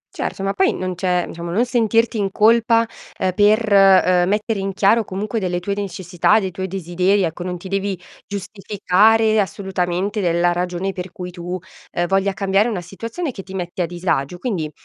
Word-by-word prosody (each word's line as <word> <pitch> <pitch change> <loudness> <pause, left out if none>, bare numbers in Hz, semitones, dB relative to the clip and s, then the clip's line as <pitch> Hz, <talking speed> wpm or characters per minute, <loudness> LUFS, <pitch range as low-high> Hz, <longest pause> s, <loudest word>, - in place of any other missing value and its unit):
Certo, 195 - -4
ma 195 0 0
poi 385 - +2
non 185 0 -3
c'è 180 -1 0
diciamo 170 0 -7
non 220 +8 +1
sentirti 230 -1 +1
in 195 -1 0
colpa, 230 +2 +4 0.3
ehm, 185 - 0
per, 215 +3 +3
uhm, 185 -2 +5
mettere 210 0 0
in 195 0 -2
chiaro 215 +4 +3
comunque 210 +4 -3
delle 180 -3 -1
tue 200 +3 -3
necessità, 190 0 +1
dei 190 -3 -3
tuoi 190 +1 -4
desideri, 185 +2 0
ecco, 165 +1 -3
non 180 0 -3
ti 185 +2 -10
devi 195 -1 -2 0.3
giustificare 210 +2 +2
assolutamente 190 +1 -2
della 175 -1 +2
ragione 180 +2 -2
per 180 0 -6
cui 180 0 -7
tu, 175 +1 -5 0.4
ehm, 175 - 0
voglia 195 +2 +1
cambiare 195 +3 +1
una 195 -6 -3
situazione 230 - -5
che 195 - -8
ti 190 0 -10
mette 180 0 -4
a - - +2
disagio. 175 -2 -2
Quindi, 175 -8 -3
195 Hz, 180 wpm, -20 LUFS, 180-210 Hz, 0.4 s, uhm